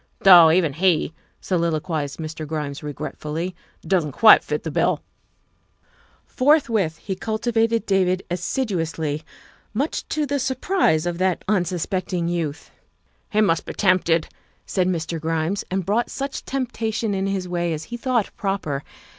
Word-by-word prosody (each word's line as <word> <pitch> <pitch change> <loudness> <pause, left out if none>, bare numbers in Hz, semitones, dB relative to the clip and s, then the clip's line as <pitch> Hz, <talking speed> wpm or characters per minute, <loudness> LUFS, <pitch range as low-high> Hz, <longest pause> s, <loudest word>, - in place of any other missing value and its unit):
" - - -42
Though 175 -4 +9
even 165 -3 +3
he," 165 -1 +2 0.3
soliloquized 160 -4 -1
Mr. 155 -1 -6
Grimes 150 -2 -4
regret 150 -1 -6
fully, 165 +4 -3 0.2
" - - -37
doesn't 170 -7 +1
quite 220 - +7
fill - - -1
the - - -6
bill." - - +1 1.2
Forthwith 235 - +2
he 195 - -5
cultivated 225 +2 0
David 185 -1 +1
assiduously, 165 - -2 0.5
much 280 +8 -2
to 305 -1 0
the 285 0 -1
surprise 260 - +1
of 175 0 -2
that 185 -2 0
unsuspecting 180 -2 -1
youth. 165 -4 -3 0.2
' - - -44
' - - -42
He 215 - +2
must 165 -6 +2
be - - -4
tempted, 180 -4 +2 0.2
' - - -37
' - - -41
said 185 -2 0
Mr. 165 -2 -2
Grimes, 165 +4 -1
and 185 -1 -2
brought 220 +5 +1
such 275 0 -5
temptation 225 -5 -2
in 195 0 -1
his 195 -2 -2
way 175 -1 -1
as 155 -1 -3
he - - -1
thought 240 -3 0
proper. 195 -9 -2
185 Hz, 155 wpm, -22 LUFS, 160-215 Hz, 1.2 s, Though